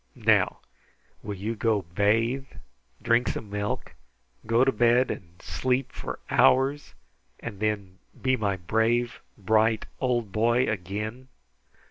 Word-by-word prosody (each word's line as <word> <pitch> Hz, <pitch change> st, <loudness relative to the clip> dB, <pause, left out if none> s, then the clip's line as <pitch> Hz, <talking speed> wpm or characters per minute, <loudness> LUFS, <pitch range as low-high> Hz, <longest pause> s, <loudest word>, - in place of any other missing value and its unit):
Now -, -, +2 dB, 0.6 s
will 105 Hz, -, -5 dB
you 105 Hz, +4 st, -3 dB
go 110 Hz, -2 st, +1 dB
bathe, 115 Hz, +9 st, +1 dB, 0.6 s
drink 120 Hz, +1 st, +3 dB
some 105 Hz, -2 st, -4 dB
milk, 105 Hz, 0 st, -3 dB, 0.5 s
go 115 Hz, +2 st, +4 dB
to 135 Hz, -, +3 dB
bed, 120 Hz, +2 st, +3 dB
and 85 Hz, -2 st, -9 dB
sleep 125 Hz, +10 st, -1 dB
for -, -, -6 dB
hours, 135 Hz, +3 st, +3 dB, 0.4 s
and 105 Hz, -5 st, -7 dB
then 100 Hz, -3 st, -2 dB, 0.2 s
be 130 Hz, 0 st, +2 dB
my 100 Hz, -5 st, 0 dB
brave, 115 Hz, +6 st, 0 dB, 0.2 s
bright 110 Hz, +2 st, +2 dB
old 120 Hz, -5 st, 0 dB
boy 120 Hz, +4 st, +2 dB
again?" 105 Hz, +6 st, -4 dB
110 Hz, 120 wpm, -26 LUFS, 100-120 Hz, 0.6 s, go